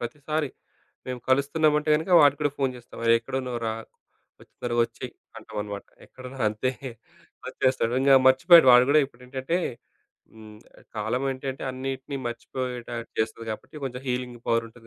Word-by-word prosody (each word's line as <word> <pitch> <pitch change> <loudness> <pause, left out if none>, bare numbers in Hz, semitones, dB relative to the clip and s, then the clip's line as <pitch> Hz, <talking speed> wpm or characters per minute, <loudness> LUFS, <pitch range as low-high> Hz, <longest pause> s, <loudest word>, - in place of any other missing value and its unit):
ప్రతిసారీ 150 +4 -3 0.6
మేము 125 -1 -5
కలుస్తున్నమంటే 150 +3 +2
గనక 160 +5 -1
వాడికి 145 0 +4
గూడా 145 - +2
ఫోను 135 -2 0
జేస్తం 120 -1 -12
అరే! 115 0 +6
ఎక్కడ 115 - -9
ఉన్నవురా? 120 -3 -3 0.7
ఒచ్చెయ్ - - -17
తొరగొచ్చెయి 120 -1 -1 0.3
అంటమనమాట. 105 -1 -6 0.2
ఎక్కడువు 130 +1 -11
అంతే. 110 +4 -1 0.8
ఒచ్చేస్తాడు. 130 -3 0
ఇంగ 135 0 +4
మర్చిపోయాడు 145 +4 +7
వాడు 125 0 +8
గూడా 155 +1 +6
ఇప్పుడేంటంటే 130 +5 -4 0.8
హ్మ్. 110 -1 -13 0.4
కాలమేంటంటే 130 +5 -2
అన్నీటిని 135 +2 -5
మర్చిపోయేటట్టు 120 -1 -5
జేస్తది 110 +1 -2
గాబట్టి, 110 +7 -8
కొంచెం 125 -1 -5
హీలింగ్ 125 -1 -3
పవరుంటది 115 0 -2
130 Hz, 125 wpm, -26 LUFS, 115-135 Hz, 0.8 s, వాడు